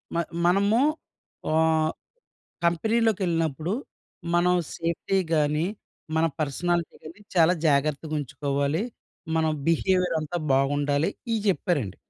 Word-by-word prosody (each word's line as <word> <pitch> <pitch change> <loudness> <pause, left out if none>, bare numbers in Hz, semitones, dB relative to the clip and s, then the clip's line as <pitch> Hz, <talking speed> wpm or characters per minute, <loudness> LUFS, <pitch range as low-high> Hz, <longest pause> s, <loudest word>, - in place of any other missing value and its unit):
మ - - +1 0.3
మనము 200 +5 +3 0.7
ఆహ్, 160 0 +3 0.7
కంపెనీలోకెళ్ళినప్పుడు, 175 - +1 0.6
మనం 180 +1 +4 0.2
సేఫ్టీ 170 +3 -1 0.2
గానీ, 150 +1 +2 0.5
మన 160 +1 +3
పర్సనాలిటీ 170 +3 -1
గానీ 165 +6 -11
చాలా 170 0 +5
జాగర్తగుంచుకోవాలి. 145 - 0 0.5
మన 160 - +2 0.2
బిహేవియరంతా 175 -2 +1 0.2
బాగుండాలి. 145 +3 +2 0.2
ఇయి 225 - +1
చెప్పారండి. 145 - 0
160 Hz, 85 wpm, -26 LUFS, 150-180 Hz, 0.7 s, చాలా